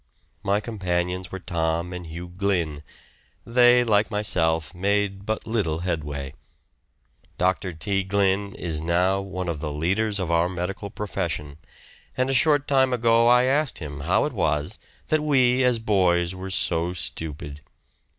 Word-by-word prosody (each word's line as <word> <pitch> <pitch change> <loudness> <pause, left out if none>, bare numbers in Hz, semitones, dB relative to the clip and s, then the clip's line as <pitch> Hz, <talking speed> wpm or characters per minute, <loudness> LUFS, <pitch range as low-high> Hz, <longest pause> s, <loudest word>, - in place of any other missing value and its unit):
My 100 0 +1
companions 90 -4 -2
were 95 - -4
Tom 85 -1 -2
and 90 -1 -7
Hugh 85 +2 -7
Glynn; 90 -5 -1 0.6
they, 120 +1 +5
like 105 -2 +2
myself, 80 -7 0
made 100 +1 -1
but 110 0 -2
little 90 -8 -1
headway. 75 -5 -3 1.0
Dr. 95 +1 0
T. 95 +4 -1
Glynn 100 0 0
is 80 -3 -3
now 90 +4 +1
one 95 -2 -5
of 85 -3 -2
the 75 -1 -4
leaders 100 +8 0
of 90 -3 -2
our 85 +1 +2
medical 95 +3 -4
profession, 75 -8 -4 0.6
and 130 +1 +1
a - - +1
short 145 +1 +3
time 130 -2 +3
ago 115 -1 +3
I 125 +1 +6
asked 140 +2 +1
him 70 -3 -6
how - - +2
it - - -3
was 75 0 -1 0.3
that 155 0 +2
we 130 -4 +3
as 125 -2 +3
boys 90 -5 +2
were 95 +1 -7
so 85 -1 +1
stupid. 75 -3 -4
95 Hz, 150 wpm, -24 LUFS, 85-110 Hz, 1.0 s, I